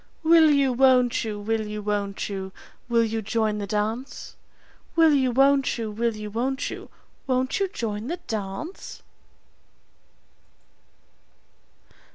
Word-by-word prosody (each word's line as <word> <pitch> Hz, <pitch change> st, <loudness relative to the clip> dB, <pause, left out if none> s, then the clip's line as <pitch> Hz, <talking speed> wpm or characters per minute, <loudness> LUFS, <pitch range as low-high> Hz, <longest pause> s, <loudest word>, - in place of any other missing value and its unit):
Will 320 Hz, -1 st, +6 dB
you, 280 Hz, -3 st, +3 dB
won't 255 Hz, -1 st, +4 dB
you, 215 Hz, -2 st, -4 dB
will 220 Hz, +1 st, -2 dB
you, 210 Hz, 0 st, -5 dB
won't 205 Hz, -1 st, -2 dB
you, 190 Hz, -2 st, -5 dB, 0.4 s
will 235 Hz, -1 st, +3 dB
you 225 Hz, 0 st, -2 dB
join 215 Hz, 0 st, -1 dB
the 200 Hz, -, -4 dB
dance? 220 Hz, +6 st, -3 dB, 0.6 s
Will 325 Hz, -2 st, +5 dB
you, 265 Hz, -3 st, +3 dB
won't 275 Hz, +2 st, +3 dB
you, 225 Hz, -2 st, -4 dB
will 230 Hz, +1 st, -1 dB
you, 210 Hz, -1 st, -7 dB
won't 260 Hz, +5 st, -2 dB
you, -, -, -8 dB, 0.4 s
won't 255 Hz, +3 st, 0 dB
you 395 Hz, -, +1 dB
joint 225 Hz, -, -4 dB
the 345 Hz, +4 st, -3 dB
dance? 215 Hz, -, -6 dB
230 Hz, 130 wpm, -25 LUFS, 210-270 Hz, 0.6 s, Will